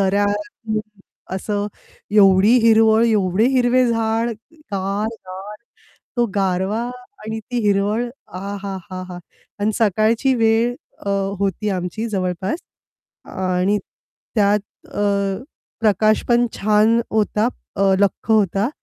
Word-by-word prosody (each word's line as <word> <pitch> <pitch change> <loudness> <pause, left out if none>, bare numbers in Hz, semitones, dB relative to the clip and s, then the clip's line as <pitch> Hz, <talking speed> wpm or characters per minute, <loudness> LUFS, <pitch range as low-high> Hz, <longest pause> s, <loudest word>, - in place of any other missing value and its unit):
दऱ्या, 200 +1 +2 1.1
असं 205 +2 -2 0.4
एवढी 200 +1 +6
हिरवळ, 225 0 +5
एवढे 205 -1 +2
हिरवे 250 0 +4
झाड, 225 0 0 0.4
गार, 200 +2 -1 0.2
गार 190 +3 -8 0.6
तो 240 - +3
गारवा 195 +2 0 0.4
आणि 220 +1 -4
ती 245 - -1
हिरवळ 205 +3 +2 0.3
आहाहाहा! 190 -1 -6 0.4
आणि 210 +2 +1
सकाळची 220 +5 +2
वेळ 225 0 +3 0.3
अ, - - +1 0.3
होती 200 +2 -1
आमची 185 +4 -3
जवळपास. 190 - -2 0.7
अ, - - -13
आणि 185 +2 0 0.6
त्यात 210 -1 +3 0.3
अ, - - -5 0.8
प्रकाश 215 0 +3
पण 240 0 +4
छान 215 +3 +3
होता 215 +1 +1 0.3
अ, 195 - +1 0.2
लख्ख 200 +2 0
होता 205 0 +3
210 Hz, 105 wpm, -20 LUFS, 195-225 Hz, 1.1 s, एवढी